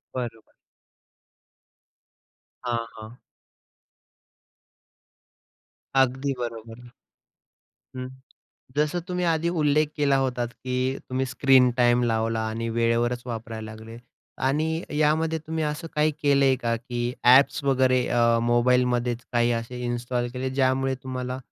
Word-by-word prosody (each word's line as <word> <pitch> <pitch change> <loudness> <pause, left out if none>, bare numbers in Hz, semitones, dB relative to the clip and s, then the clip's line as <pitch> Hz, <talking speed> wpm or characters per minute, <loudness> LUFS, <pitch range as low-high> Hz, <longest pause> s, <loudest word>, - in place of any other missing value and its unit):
बरोबर. 115 -3 -6 2.1
हां, 115 -1 -1
हां. 110 +3 -11 2.8
अगदी 135 +1 +2
बरोबर. 115 0 -7 1.1
हं. 130 0 -5 0.7
जसं 150 +4 +1
तुम्ही 180 0 -1
आधी 165 0 +1
उल्लेख 155 -2 +2
केला 140 -2 +2
होतात 125 -3 -1
की 130 0 -6 0.3
तुम्ही 130 +1 -1
स्क्रीन 130 0 +4
टाईम 120 0 +4
लावला 115 -1 0
आणि 115 +1 -3
वेळेवरच 115 +1 0
वापरायला 110 -2 -6
लागले. 110 +1 -11 0.5
आणि 155 +5 0 0.2
यामध्ये 160 +1 +2
तुम्ही 160 0 -3
असं 150 +3 -3
काही 150 +1 +3
केलंय 140 -2 +4
का? 115 -2 -1
की 120 0 -3
ॲप्स 130 +3 +6
वगैरे 130 -2 +2
अ, 115 -1 +3
मोबाईलमध्येच 120 0 +2
काही 120 0 +2
असे 115 +2 -4
इन्स्टॉल 120 0 -2
केले 130 +1 -3
ज्यामुळे 130 0 +1
तुम्हाला 130 0 -4
125 Hz, 110 wpm, -25 LUFS, 120-140 Hz, 2.8 s, ॲप्स